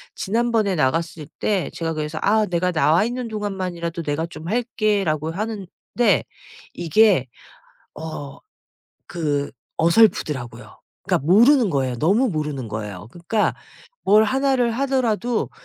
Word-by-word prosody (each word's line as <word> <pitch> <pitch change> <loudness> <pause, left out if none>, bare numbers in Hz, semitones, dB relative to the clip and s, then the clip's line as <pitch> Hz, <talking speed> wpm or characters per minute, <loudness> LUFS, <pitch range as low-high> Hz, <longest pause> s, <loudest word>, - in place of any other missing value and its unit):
지난번에 225 -2 0
나갔을 155 +1 -1
때 200 -4 0
제가 165 -1 -3
그래서 155 0 -4
"아 215 +1 +3
내가 180 -1 0
나와 160 +1 +3
있는 245 +2 -3
동안만이라도 185 -6 -4
내가 150 +2 -1
좀 160 -1 -10
할게."라고 205 - 0
하는데 210 +1 -4 1.1
이게 175 - +3 0.7
어 150 -3 -7 0.7
그 145 -5 -2 0.3
어설프더라고요. 160 - +1 0.2
그러니까 140 - -1
모르는 235 - +5
거예요. 130 -5 -1
너무 205 - +3
모르는 150 -7 -3
거예요. 105 -2 -6
그러니까 175 - -1 0.5
뭘 210 +2 +6
1 270 +2 +1
를 240 -2 +2
하더라도 245 -2 0
180 Hz, 290 characters per minute, -22 LUFS, 155-220 Hz, 1.1 s, 뭘